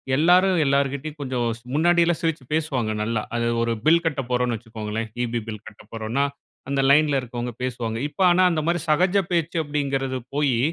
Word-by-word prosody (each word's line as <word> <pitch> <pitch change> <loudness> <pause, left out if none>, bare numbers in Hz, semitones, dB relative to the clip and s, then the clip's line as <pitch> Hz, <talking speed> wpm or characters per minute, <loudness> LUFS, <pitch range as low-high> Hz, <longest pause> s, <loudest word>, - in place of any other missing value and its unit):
எல்லாரும் 180 +3 +4
எல்லார்கிட்டயும் 140 +2 0
கொஞ்சம் 125 -3 -1
ஸ் - - -21
முன்னாடில்லாம் 170 +1 +3
சிரிச்சு 160 -5 -1
பேசுவாங்க 140 -8 0
நல்லா. 110 0 -1
அது 115 0 0
ஒரு 115 0 0
பில் 170 +2 +5
கட்டப்போறோம்ன்னு 125 -5 0
வச்சுக்கோங்களேன் 110 0 -5
ஈபி 120 0 -2
பில் 110 -1 -7
கட்டப்போறோம்ன்னா, 110 +4 -4 0.5
அந்த 140 -1 +1
லைன்ல 145 -1 +4
இருக்கவங்க 120 0 -5
பேசுவாங்க. 120 -3 -3
இப்ப 190 - -7
ஆனா 185 +1 +4
அந்த 155 -2 0
மாரி 175 +1 +1
'சகஜ 180 +6 +3
பேச்சு' 170 -1 0
அப்படிங்கறது 135 -3 -2 0.2
போயி, 140 -5 +2
135 Hz, 155 wpm, -23 LUFS, 120-160 Hz, 0.5 s, பில்